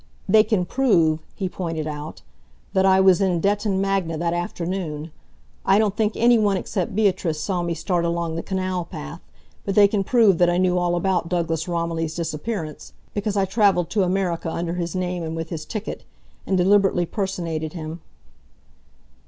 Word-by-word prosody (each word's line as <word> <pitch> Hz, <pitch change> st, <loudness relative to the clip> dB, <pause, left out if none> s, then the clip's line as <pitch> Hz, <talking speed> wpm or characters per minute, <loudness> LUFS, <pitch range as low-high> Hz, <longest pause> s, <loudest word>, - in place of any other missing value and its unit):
"They 215 Hz, -1 st, +6 dB
can 205 Hz, -5 st, 0 dB
prove," 170 Hz, -10 st, +2 dB, 0.2 s
he 190 Hz, -, -2 dB
pointed 165 Hz, -4 st, -4 dB
out, 150 Hz, 0 st, -6 dB, 0.5 s
"that 190 Hz, -1 st, +3 dB
I 190 Hz, 0 st, +5 dB
was 190 Hz, 0 st, +5 dB
in 185 Hz, -3 st, +2 dB
Detton 200 Hz, +2 st, +1 dB
Magna 195 Hz, -4 st, 0 dB
that 170 Hz, +1 st, -1 dB
afternoon. 170 Hz, -3 st, -3 dB, 0.5 s
I 195 Hz, -, +4 dB
don't 210 Hz, -2 st, +2 dB
think 215 Hz, 0 st, +1 dB
any 235 Hz, 0 st, +4 dB
one 205 Hz, -2 st, +2 dB
except 185 Hz, -1 st, -3 dB
Beatrice 185 Hz, -7 st, +1 dB
saw 180 Hz, +1 st, -1 dB
me 170 Hz, -1 st, -2 dB
start 170 Hz, +2 st, -1 dB
along 170 Hz, -1 st, -1 dB
the 165 Hz, -, -2 dB
canal 185 Hz, -1 st, -2 dB
path, 160 Hz, 0 st, -8 dB, 0.4 s
but 195 Hz, -, -2 dB
they 205 Hz, -1 st, +7 dB
can 200 Hz, -1 st, 0 dB
prove 215 Hz, -5 st, +4 dB
that 175 Hz, -1 st, +5 dB
I 175 Hz, -, +1 dB
knew 180 Hz, 0 st, +2 dB
all 175 Hz, 0 st, +1 dB
about 175 Hz, -1 st, 0 dB
Douglas 165 Hz, -2 st, -1 dB
Romilly's 165 Hz, -2 st, -2 dB
disappearance, 165 Hz, 0 st, -4 dB, 0.2 s
because 205 Hz, 0 st, -2 dB
I 195 Hz, -, +3 dB
travelled 190 Hz, -4 st, +2 dB
to 210 Hz, -, +2 dB
America 180 Hz, -3 st, 0 dB
under 170 Hz, +1 st, -3 dB
his 175 Hz, 0 st, -3 dB
name 180 Hz, -1 st, -2 dB
and 160 Hz, 0 st, -4 dB
with 165 Hz, 0 st, -4 dB
his 155 Hz, -2 st, -5 dB
ticket, 215 Hz, -1 st, -5 dB, 0.4 s
and 190 Hz, -, +1 dB
deliberately 195 Hz, -1 st, +3 dB
personated 170 Hz, -5 st, -3 dB
him." 160 Hz, -1 st, -6 dB
180 Hz, 175 wpm, -23 LUFS, 165-195 Hz, 0.5 s, they